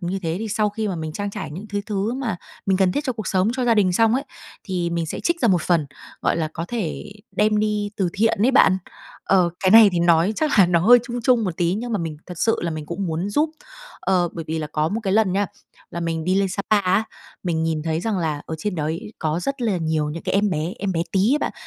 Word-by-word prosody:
như 180 +2 -2
thế 165 0 -1
thì 220 +1 -4
sau 215 0 +1
khi 215 +1 -3
mà 185 - -3
mình 160 -1 -5
trang 205 +2 -3
trải 205 -5 -6
những 180 +8 -7
thứ 205 0 -2
thứ 210 +2 -1
mà 245 -8 -2 0.3
mình 190 -1 +3
cần 190 -2 +3
thiết 290 - -2
cho 255 - 0
cuộc 215 -3 -6
sống, 185 +1 +2
cho 255 - 0
gia 235 -2 +4
đình 195 -4 +3
xong 225 +4 +3
ấy, 275 +3 -1 0.4
thì 180 -3 -2
mình 170 -1 -1
sẽ - - -5
trích 340 0 0
ra 235 - +3
một 180 -5 +3
phần, 165 -5 +1 0.4
gọi - - +1
là, 160 -2 -1
có 165 - -3
thể 210 -2 -4 0.2
đem 210 0 +3
đi 210 -1 0
từ 190 -3 +1
thiện 220 +1 +1
ấy 250 - +5
bạn. 190 -8 +5 0.5
Ờ, 180 -3 +3
cái 190 - +3
này 220 0 +9
thì 175 - 0
nói 170 +3 +4
chắc 305 -7 +1
là 190 - +8
nó 170 -1 +2
hơi 245 +7 +7
chung 240 0 -5
chung 240 -2 +3
một 180 -3 -3
tí, 175 +1 +1
nhưng 235 +3 -4
mà 210 - +1
mình 165 -3 -4
thật 180 -2 -8
sự 225 - +2
là 170 - -1
mình 155 -2 -5
cũng 175 +3 -3
muốn 170 +5 -2
giúp. 305 +8 +1 0.5
Ờ, 180 -2 +2
bởi 165 - -6
vì 160 0 -1
là 155 - -3
có 155 +1 -1
một 215 +6 -2
cái 190 - 0
lần 215 -3 +3
nha, 200 +1 +1 0.4
là 170 - -5
mình 165 -1 -2
đi 185 - +1
lên 195 0 +2
Sa 200 +2 -3
Pa 215 -1 +5
á, 190 +3 +2 0.4
mình 165 -3 -1
nhìn 160 -1 -1
thấy 160 0 -1
rằng 215 -1 -1
là 155 -3 -2
ở 160 - -4
trên 200 +4 -2
đấy 165 +8 -3
có 160 +1 -1
rất 275 +3 -3
là 215 -5 +1
nhiều 160 -3 -1
những 165 +2 -6
cái - - -2
em 205 +1 +2
bé, 160 +1 -2
em 200 -1 -1
bé 165 -1 0
tí 190 - +2
ấy - - +1
bạn, - - -2
190 Hz, 280 wpm, -22 LUFS, 165-215 Hz, 0.5 s, này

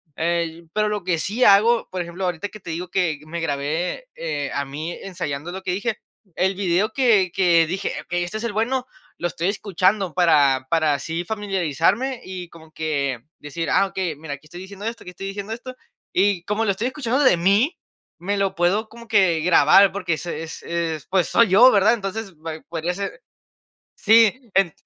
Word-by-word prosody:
eh, 170 0 -1
pero 210 0 +1
lo 210 -2 -2
que 175 -2 0
sí 225 +9 +1
hago, 220 +4 +5
por 185 - -3
ejemplo, 175 +2 -6
ahorita 180 +2 -2
que 215 -1 -13
te - - -9
digo 175 +3 -4
que 175 -5 0
me 170 +2 -5
grabé, 160 - -2
eh, - - -3
a 140 - -1
mí, 150 +5 -5
ensayando 170 -4 -5
lo 190 +1 -6
que 190 - -2
dije. 215 +3 -2 0.4
El 190 +1 +1
video 190 +2 +1
que 215 -9 +3
que 170 -4 +4
dije: 190 +4 -2
"Okey, 175 +1 -2
este 195 +5 -4
es 220 - -6
el 235 - -1
bueno", 250 +4 -1 0.3
lo 175 - 0
estoy 170 +1 -3
escuchando 195 -2 0
para 145 -7 +4
para 155 -3 +3
así 165 +5 -3
familiarizarme 200 - 0
y 180 -2 -7
como 160 -1 -16
que 140 -6 -2 0.2
decir: 165 +3 -5
"Ah, 195 - +4
okey, 185 -4 -3
mira, 145 0 -7
aquí 145 +2 -11
estoy 175 +3 -10
diciendo 200 +2 -9
esto, 230 0 -5
aquí 180 - -9
estoy 195 +2 -7
diciendo 200 +2 -5
esto", 255 +2 -8 0.4
y 190 -2 +2
como 210 +2 0
lo 200 - +2
estoy 215 +6 -2
escuchando 260 -1 -1
de 255 -10 +5
mí, 200 - +2 0.4
me 200 +3 -2
lo 195 -1 0
puedo 195 +6 +1
como 235 +1 -13
que 190 -7 +3
grabar 180 +3 +6
porque 185 -3 -2
es 160 - -4
es 165 -1 -6
es 165 -3 -3
pues, 190 -2 +2
soy 230 -2 +4
yo, 235 +7 +8
¿verdad? 210 +3 +4
Entonces 200 -2 -4
va 160 +1 -6 0.2
podría 170 +1 -2
ser 200 - -5 0.7
Sí, 225 +2 +4
en 195 -5 +3
185 Hz, 195 wpm, -22 LUFS, 165-210 Hz, 0.7 s, yo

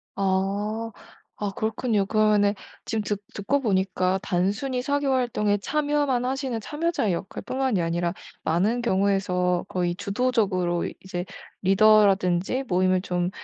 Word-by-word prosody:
아. 200 +4 -1 0.5
아 205 -1 -1
그렇군요. 220 -2 0
그러면은 210 -1 +3 0.3
지금 220 -2 -2
듣 205 0 -3
듣고 275 +8 0
보니까 190 -3 +1
단순히 200 +8 -1
사교 285 +1 0
활동에 220 -5 +1
참여만 290 0 0
하시는 260 -3 -2
참여자의 295 - -1
역할뿐만이 225 +3 -2
아니라 170 +1 -1 0.3
많은 210 +9 +1
경우에서 190 -4 +1
거의 175 -1 -1
주도적으로 200 -5 0
이 - - -5
이제 180 -2 -5 0.4
리더라든지 195 +2 +4
모임을 185 0 +2
좀 180 -1 -1
205 Hz, 310 characters per minute, -25 LUFS, 185-240 Hz, 0.5 s, 리더라든지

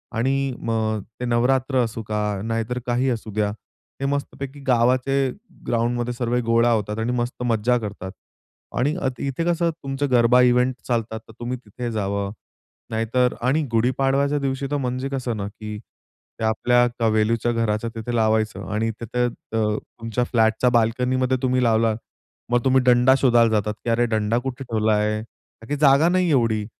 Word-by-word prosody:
आणि 135 +3 0
मग 110 -2 -1 0.2
ते 125 - -3
नवरात्र 130 +3 +1
असू 115 0 -4
का 105 - -2 0.3
नाहीतर 115 +2 -2
काही 125 +2 +1
असू 115 -3 -3
द्या. 105 -1 0 0.5
ते 135 - -2
मस्तपैकी 140 0 -3
गावाचे 125 +2 +2 0.5
ग्राउंडमध्ये 120 +1 0
सर्व 120 0 -1
गोळा 115 +1 +3
होतात 105 -1 -1
आणि 115 +2 -1
मस्त 125 0 -2
मज्जा 120 +1 +2
करतात 100 -4 -6 0.7
आणि 145 +6 +1
अथ 130 -2 -2
इथे 140 +4 -2
कसं 170 0 +1
तुमचं 140 -2 -3
गरबा 125 +1 +5
इव्हेंट 125 +1 +3
चालतात, 115 -2 -1
तर - - -13
तुम्ही 120 +1 -3
तिथे 120 +1 -6
जावं, 100 -2 -2 0.6
नाहीतर 115 +3 +1
आणि 135 +6 +2
गुढी 115 +2 +2
पाडव्याच्या 140 +2 +2
दिवशी, 135 0 -2
तर 145 - +1
म्हणजे 130 0 -2
कसं 125 -5 -3
ना, 100 - -3
की 105 0 -7 0.6
ते - - -4
आपल्या 120 +2 +3
कवेलूच्या 115 +1 +2
घराच्या 115 -1 -1
तिथे 115 +2 -4
लावायचं 110 -1 +1
आणि 110 +1 0
तिथं 120 +2 0 0.3
अ, 105 -1 +1 0.2
तुमच्या 115 +1 -1
फ्लॅटच्या 115 0 +2
बाल्कनीमध्ये 125 +2 +1
तुम्ही 130 -1 +1
लावलात. 115 -1 +2 0.5
मग 120 -1 +2
तुम्ही 130 0 +4
डंडा 125 +1 +5
शोधायला 120 -3 +4
जातात, 105 -1 0
की - - -2
अरे 115 +1 +3
डंडा 110 0 0
कुठे 130 +1 -5
ठेवलाय? 110 -2 +1 0.4
का 115 - -12
की 145 - -1
जागा 140 +3 +5
नाही 180 0 +2
एवढी. 115 -6 +2
120 Hz, 160 wpm, -23 LUFS, 110-130 Hz, 0.7 s, गरबा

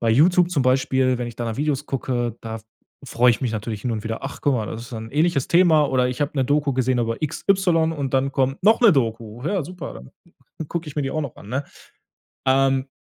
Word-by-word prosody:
Bei 115 - +1
YouTube 175 +8 +4
zum 150 -7 +1
Beispiel, 130 0 +2
wenn 120 - -3
ich 120 -1 -8
da 120 - -3
nach 115 -1 -3
Videos 145 0 -1
gucke, 120 -3 -2
da 110 0 -6 0.5
freue 125 0 +4
ich 115 - -1
mich 120 -4 -1
natürlich 110 -1 -4
hin 125 - -2
und 110 -1 -4
wieder: 110 0 -4
„Ach, 135 - -6
guck 145 - +2
mal, 110 -4 -2
das 115 +2 -6
ist 120 - -12
dann 110 -1 -6
'n - - -16
ähnliches 155 -2 +1
Thema“ 170 -4 +5
oder 130 -2 +1
„ich 125 +2 -5
habe 145 0 0
'ne 135 - +2
Doku 145 +1 +1
gesehen 130 -1 +1
über 115 +1 -2
x 155 0 -3
y 175 -5 +3
und 140 -4 -3
dann 135 +1 +1
kommt 135 0 0
noch 220 +3 +5
'ne 235 -4 +7
Doku. 115 -4 -2
Ja, 195 0 0
super, 180 -1 -8
dann 65 - -12 0.6
gucke 170 -1 -4
ich 150 - -10
mir 150 - +1
die 135 - -2
auch 155 - -2
noch 140 -5 -6
an“, 100 - -13
ne? 130 +5 -2 0.8
Ähm, 135 0 +2
130 Hz, 250 wpm, -22 LUFS, 120-150 Hz, 0.8 s, ne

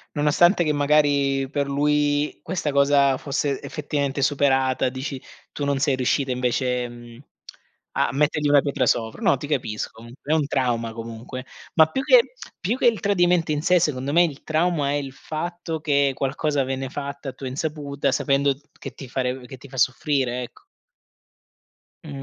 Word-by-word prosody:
Nonostante 165 +5 +4
che 150 -2 +1
magari 140 -2 +2
per 145 -1 -1
lui, 145 +1 +1
questa 160 -4 -2
cosa 140 -1 +4
fosse 140 0 -2
effettivamente 145 -2 -2
superata, 135 -2 +2
dici 130 +1 -5 0.3
tu 145 - -4
non 140 -1 0
sei 140 0 +2
riuscita 130 +1 0
invece, 125 0 0
ehm, 120 -1 -10 0.7
a - - +1
mettergli 150 +1 +1
una 145 -1 +6
pietra 135 -3 0
sopra 110 -1 0
no, 140 - +4
ti 145 - -7
capisco 125 -8 -2
comunque, 115 +6 -9
è 160 - +5
un 155 - +1
trauma 120 -4 -1
comunque. 115 +3 -7 0.3
Ma 160 -2 +7
più 265 +12 -3
che - - +5 0.3
più 210 +8 -1
che 255 - -1
il 225 -2 +3
tradimento 175 -4 +2
in 150 -1 0
sé, 180 0 +4
secondo 140 -4 -1
me 175 +2 +6
il 150 -4 -3
trauma, 155 -2 +1
è - - 0
il 140 -2 -4
fatto 165 +2 -5
che 140 -3 +2
qualcosa 140 +1 0
viene 135 0 -3
fatto 140 0 -5
a - - -8
tua 135 - -7
insaputa, 140 0 -2
sapendo 140 0 +2 0.2
che - - -7
ti 135 - -10
far 130 -1 -2
che 130 - -10
ti 135 - -13
fa 130 - -10
soffrire 130 -1 +1
ecc 120 - -13 1.4
Mh. - - -10
140 Hz, 170 wpm, -23 LUFS, 130-150 Hz, 1.4 s, Ma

